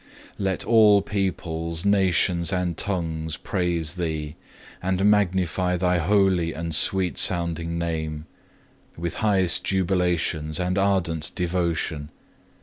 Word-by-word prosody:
5. -, -, -30 dB
Let 95 Hz, -3 st, -1 dB
all 105 Hz, -3 st, +5 dB
peoples, 85 Hz, -4 st, -3 dB
nations, 90 Hz, -4 st, +2 dB
and 90 Hz, -2 st, -1 dB
tongues 80 Hz, -5 st, -3 dB
praise 85 Hz, -3 st, -2 dB
Thee, 80 Hz, -4 st, -4 dB, 0.5 s
and 95 Hz, +1 st, 0 dB
magnify 95 Hz, -3 st, +1 dB
Thy 90 Hz, 0 st, +1 dB
holy 95 Hz, -2 st, +2 dB
and 85 Hz, 0 st, -5 dB
sweet 95 Hz, +3 st, +2 dB
sounding 85 Hz, -2 st, +1 dB
Name, 80 Hz, -2 st, -3 dB, 0.7 s
with 85 Hz, 0 st, -4 dB
highest 95 Hz, -5 st, +2 dB
jubilations 90 Hz, -4 st, 0 dB
and 90 Hz, +1 st, 0 dB
ardent 90 Hz, -5 st, 0 dB
devotion. 85 Hz, -4 st, -2 dB
90 Hz, 110 wpm, -24 LUFS, 80-95 Hz, 0.7 s, all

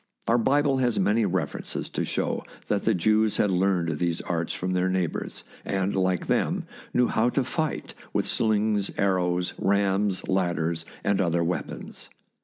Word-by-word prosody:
Our 120 Hz, +1 st, +4 dB
Bible 140 Hz, +3 st, +3 dB
has 120 Hz, -3 st, +1 dB
many 110 Hz, +2 st, +3 dB
references 90 Hz, -6 st, -2 dB
to -, -, -1 dB
show -, -, -1 dB, 0.3 s
that -, -, 0 dB
the -, -, +3 dB
Jews 110 Hz, +4 st, +2 dB
had 105 Hz, -, +2 dB
learned 90 Hz, -4 st, +1 dB
these 85 Hz, -1 st, 0 dB
arts 85 Hz, -2 st, -2 dB
from 90 Hz, +1 st, -3 dB
their 90 Hz, 0 st, +1 dB
neighbours, 95 Hz, -3 st, -2 dB, 0.2 s
and, 95 Hz, 0 st, -1 dB
like 95 Hz, -2 st, +1 dB
them, -, -, 0 dB, 0.3 s
knew 125 Hz, -, +3 dB
how 115 Hz, +1 st, +2 dB
to 135 Hz, +2 st, +1 dB
fight 155 Hz, +5 st, -2 dB, 0.2 s
with -, -, 0 dB
slings, 105 Hz, -2 st, +1 dB
ar 95 Hz, -2 st, +3 dB
rows, 90 Hz, 0 st, 0 dB
rams, 100 Hz, 0 st, +1 dB
ladders, 85 Hz, -3 st, 0 dB, 0.2 s
and 100 Hz, -1 st, +2 dB
other 85 Hz, -2 st, +1 dB
weapons. 85 Hz, +1 st, -4 dB
95 Hz, 160 wpm, -26 LUFS, 90-110 Hz, 0.3 s, Our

